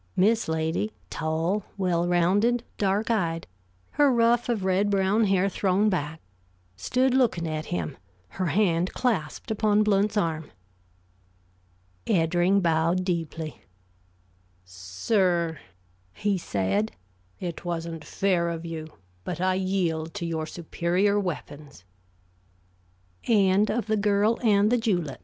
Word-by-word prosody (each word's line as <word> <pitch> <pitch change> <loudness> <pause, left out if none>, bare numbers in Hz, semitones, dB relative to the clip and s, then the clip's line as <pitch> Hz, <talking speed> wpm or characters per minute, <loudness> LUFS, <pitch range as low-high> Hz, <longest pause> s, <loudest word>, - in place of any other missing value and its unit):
Miss 220 +4 +3
Lady, 160 +6 -1 0.2
tall, 165 +6 -1
well 175 -3 +1
rounded, 200 +8 +2 0.2
dark 205 +3 +1
eyed, 165 -7 0 0.5
her 290 -1 +4
ruff 235 0 +2
of 215 -5 -1
red 190 +2 +2
brown 200 +2 +2
hair 195 -1 +2
thrown 200 +2 +1
back, 160 -2 -3 0.5
stood 255 - +1
looking 230 -10 +2
at 155 0 -4
him, 85 -3 -3 0.3
her 185 -1 -3
hand 180 -2 +1
clasped 205 -9 -2
upon 215 -1 +2
Blount's 210 0 +1
arm. 160 -5 -1 1.6
Eddring 175 +2 +2
bowed 170 +2 +1
deeply. 165 -3 -3 1.0
"Sir," 160 - -1 0.6
he 205 -1 0
said, 100 - -1 0.5
"it 175 -3 -5
wasn't 165 -2 -4
fair 180 -2 0
of 165 0 -5
you; 160 -1 -5 0.4
but 175 -2 -5
I 185 +1 +2
yield 180 -4 -1
to 185 -4 -3
your 160 -2 -3
superior 180 +5 0
weapons!" 150 - -6 1.4
THE - - +3
FINAL 195 -1 +4 0.2
CHOICE - - -24
BY 220 - -1
EDMUND 210 0 +3
VANCE 245 -2 +1
COOKE 175 - -1
185 Hz, 120 wpm, -26 LUFS, 165-205 Hz, 1.6 s, her